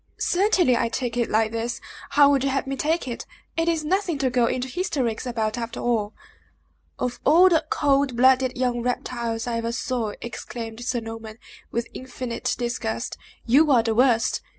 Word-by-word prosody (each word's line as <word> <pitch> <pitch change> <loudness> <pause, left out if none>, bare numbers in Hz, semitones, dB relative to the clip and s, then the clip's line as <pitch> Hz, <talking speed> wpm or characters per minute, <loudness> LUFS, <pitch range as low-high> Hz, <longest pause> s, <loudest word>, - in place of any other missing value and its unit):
"Certainly, 360 - +3
I 230 - 0
take 240 0 -3
it 240 -1 0
like 220 0 +2
this. 230 +1 -3 0.3
How 285 0 +6
would 275 -2 +2
you 275 - +1
have 270 +1 -1
me 275 0 -3
take 315 +2 0
it? 240 - -5 0.3
It 330 0 0
is 320 -2 0
nothing 360 -1 0
to 265 -2 0
go 245 -2 +3
into 255 +2 -1
hysterics 260 - -2
about, 225 -1 -1
after 230 0 -5
all!" 220 -3 -1 0.8
"Of 245 -1 -3
all 345 +6 +6
the 325 -2 +3
cold 280 -3 +2
blooded 260 0 +4
young 245 -1 0
reptiles 235 -2 -2
I 235 -1 -2
ever 230 0 -2
saw," 235 -3 -2
exclaimed 230 0 -7
Sir 245 -1 -1
Norman, 225 -1 -8 0.3
with 235 0 -2
infinite 255 -2 -4
disgust, 235 -1 -3 0.3
"you 285 +6 +5
are 240 -4 +5
the 225 -1 0
worst! 240 -1 +3
245 Hz, 175 wpm, -24 LUFS, 230-275 Hz, 0.8 s, How